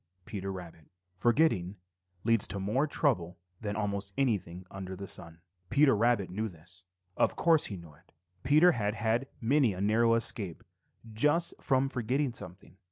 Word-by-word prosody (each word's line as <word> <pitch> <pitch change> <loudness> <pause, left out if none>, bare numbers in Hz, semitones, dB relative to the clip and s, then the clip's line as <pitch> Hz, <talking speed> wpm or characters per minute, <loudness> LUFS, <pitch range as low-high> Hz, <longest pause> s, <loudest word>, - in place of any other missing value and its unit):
Peter 95 -2 -5
Rabbit. 85 -4 -9 0.3
Forgetting 115 - +2 0.5
leads 115 -2 +3
to 100 - -4
more 115 +10 +1
trouble 95 - 0 0.2
than 105 -2 -3
almost 100 -1 -2
anything 95 -9 -1
under 95 -1 -6
the 100 +1 -7
sun. 85 -1 -13 0.3
Peter 140 -3 +5
Rabbit 110 -4 +2
knew 110 +4 -2
this. 90 +1 -13 0.3
Of - - +2
course 165 -3 +3
he 100 - -6
knew 85 -3 -12
it. 85 +4 -25 0.3
Peter 155 - +5
had 105 -6 -1
had 115 +4 0
many 125 -1 +3
a - - -7
narrow 115 +3 +3
escape 105 -6 -3 0.5
just 150 +9 +2
from 135 -1 +2
forgetting 130 +1 -1
something. 90 -2 -11
105 Hz, 155 wpm, -30 LUFS, 95-130 Hz, 0.5 s, Peter